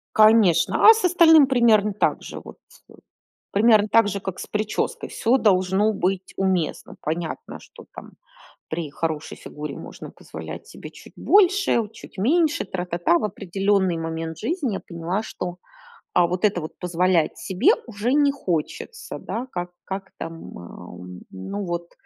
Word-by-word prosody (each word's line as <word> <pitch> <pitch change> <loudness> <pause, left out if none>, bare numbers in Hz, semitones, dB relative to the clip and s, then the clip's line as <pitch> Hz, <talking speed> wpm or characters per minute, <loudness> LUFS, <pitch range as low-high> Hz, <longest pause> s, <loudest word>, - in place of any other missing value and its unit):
Конечно. 215 - +5
А 450 - +11
с 445 - -3
остальным 325 -4 +6
примерно 230 -5 +3
так 205 - 0
же, - - -8
вот - - -12
с - - -20 0.7
примерно 215 0 +4
так 225 -1 +4
же, 200 - -2
как 190 -2 -6
с - - -7
прической. 210 0 -2
Всё 240 +3 +1
должно 195 0 +2
быть 190 -1 -2
уместно. 190 -4 -1
Понятно, 160 +1 -5
что, - - -16
там, - - -11 0.6
при 160 -2 -4
хорошей 160 +1 -4
фигуре 150 -1 -8
можно - - -9
позволять - - -9
себе - - -11
чуть - - -15
больше, 395 -5 +3
у 220 - -3
чуть 205 - -15
меньше, 300 - +2
тра 185 -2 -5
та 170 0 -4
та. 175 0 +3
В - - -3
определенный 195 -2 0
момент 165 0 -4
жизни 275 - -2
я - - -4
поняла, 170 +4 -4
что, 180 -4 -6 0.6
а, 175 -1 +4
вот 180 +4 -3
это 200 -4 +2
вот 155 - -9
позволять 180 -1 +1
себе 190 -1 +2 0.2
уже 230 +3 -2
не 290 -1 +4
хочется, 275 - -4
да. 250 +3 -5
Как 175 -3 -4
как 195 0 -6
там, 165 - -5 0.2
м, - - -8
а, 85 0 -11
у, 90 0 -10 0.3
ну, 195 - -6
вот, 170 0 -4
195 Hz, 165 wpm, -23 LUFS, 175-225 Hz, 0.7 s, А